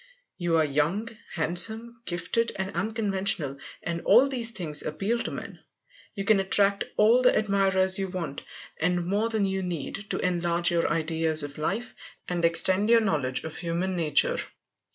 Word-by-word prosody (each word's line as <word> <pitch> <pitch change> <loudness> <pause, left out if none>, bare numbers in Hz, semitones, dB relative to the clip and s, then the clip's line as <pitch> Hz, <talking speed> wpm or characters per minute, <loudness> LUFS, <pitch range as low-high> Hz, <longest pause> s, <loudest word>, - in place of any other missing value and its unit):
You 170 -2 +1
are 160 - +3
young, 150 +10 -1 0.2
handsome, 220 +8 +1
gifted, 175 +7 -2
and 190 +1 -4
unconventional, 195 - -1 0.2
and 170 -1 -3
all 265 - +5
these 245 -4 +1
things 170 -9 +1
appeal 200 +9 -2
to - - -3
men. - - -8 0.6
You 195 -2 -4
can 210 -1 +4
attract 200 +1 +1
all 225 +4 +5
the 250 - +4
admirers 195 -2 +3
you 195 - -1
want, 175 -6 -5 0.4
and 175 +1 0
more 205 +5 0
than 220 -3 0
you 190 0 -2
need, 180 +3 -5
to - - -1
enlarge 175 -1 0
your 170 -1 +1
ideas 160 -1 0
of 145 +1 -8
life, 200 +10 -3 0.3
and 175 -1 -2
extend 185 +5 +3
your 230 -1 +6
knowledge 145 -11 -1
of 160 - -7
human 175 +2 -2
nature. 155 -4 +2
185 Hz, 160 wpm, -26 LUFS, 165-210 Hz, 0.6 s, your